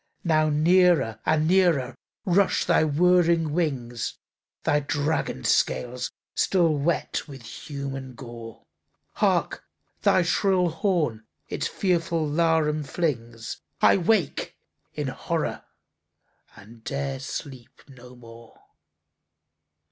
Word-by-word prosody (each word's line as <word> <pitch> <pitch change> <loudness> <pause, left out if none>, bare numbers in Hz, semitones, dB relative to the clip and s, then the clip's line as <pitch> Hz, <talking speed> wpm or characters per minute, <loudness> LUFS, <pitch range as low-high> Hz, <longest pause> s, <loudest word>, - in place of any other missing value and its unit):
Now 155 -2 +3
near 160 - +3
and 155 0 +2
nearer 170 -8 +3 0.3
rush 185 0 +2
thy 170 -2 +3
whirring 165 0 +3
wings, 130 -8 -2 0.5
Thy 145 - +2
dragon 145 - -2
scales 125 0 0 0.2
still 170 -4 +2
wet 150 +4 -1
with 135 -4 -11
human 135 0 -7
gore. 115 -3 -10 0.5
Hark, - - 0 0.4
thy 185 - +4
shrill 180 +1 +2
horn 155 - -1 0.2
its - - -2
fearful 170 -4 0
laram 155 -1 +1
flings! 120 -7 -3 0.2
—I - - +5
wake 185 -3 0 0.4
in - - -2
horror, - - -3 0.9
and 110 +3 -15
'dare 135 0 -3
sleep 135 -2 -8
no 125 -2 -14
more! 115 -1 -15
150 Hz, 100 wpm, -25 LUFS, 125-170 Hz, 0.9 s, I